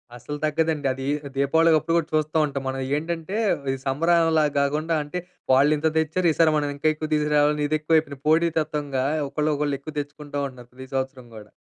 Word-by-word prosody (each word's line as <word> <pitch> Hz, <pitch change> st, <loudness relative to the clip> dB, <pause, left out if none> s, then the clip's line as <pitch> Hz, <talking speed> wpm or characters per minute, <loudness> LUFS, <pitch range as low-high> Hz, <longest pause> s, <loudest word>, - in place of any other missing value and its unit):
అసలు 145 Hz, +5 st, -7 dB
తగ్గదండదీ. 145 Hz, -4 st, -1 dB, 0.3 s
దీపావళికి 160 Hz, +4 st, +4 dB
అప్పుడు 165 Hz, +2 st, -1 dB
గూడా 165 Hz, -1 st, 0 dB
చూస్తా 155 Hz, +1 st, +1 dB
ఉంటాం 140 Hz, -2 st, -4 dB
మనం. 135 Hz, 0 st, -3 dB, 0.2 s
ఏంటంటే, 165 Hz, +4 st, -4 dB, 0.4 s
ఈ -, -, -2 dB
సంబారాలలాగా 160 Hz, +1 st, +2 dB
గాకుండా 155 Hz, +4 st, 0 dB
అంటే, 180 Hz, +5 st, -5 dB, 0.3 s
వాళ్ళింత 150 Hz, +3 st, +4 dB
తెచ్చారు, 160 Hz, +3 st, +1 dB
ఈసారి 160 Hz, -1 st, +3 dB
మనం 145 Hz, -1 st, 0 dB
ఇంకా 155 Hz, +2 st, -1 dB
ఎక్కువ 155 Hz, 0 st, -5 dB
తీసుకురావాలని 150 Hz, 0 st, +2 dB
ఇదెక్కువయిపోయింది. 155 Hz, -2 st, +1 dB
పోటీ 165 Hz, +2 st, +4 dB
తత్వంగా, 145 Hz, -4 st, -2 dB, 0.2 s
ఒకళ్ళోకళ్ళు 150 Hz, -1 st, -1 dB
ఎక్కువ 155 Hz, +2 st, -9 dB
తెచ్చుకుంటా 145 Hz, 0 st, -7 dB
ఉంటన్నారు, 125 Hz, -2 st, -13 dB
ప్రతి 130 Hz, +1 st, -10 dB
సంవత్సరం 130 Hz, -2 st, -3 dB
గూడా. 105 Hz, -1 st, -11 dB
150 Hz, 155 wpm, -24 LUFS, 140-160 Hz, 0.4 s, దీపావళికి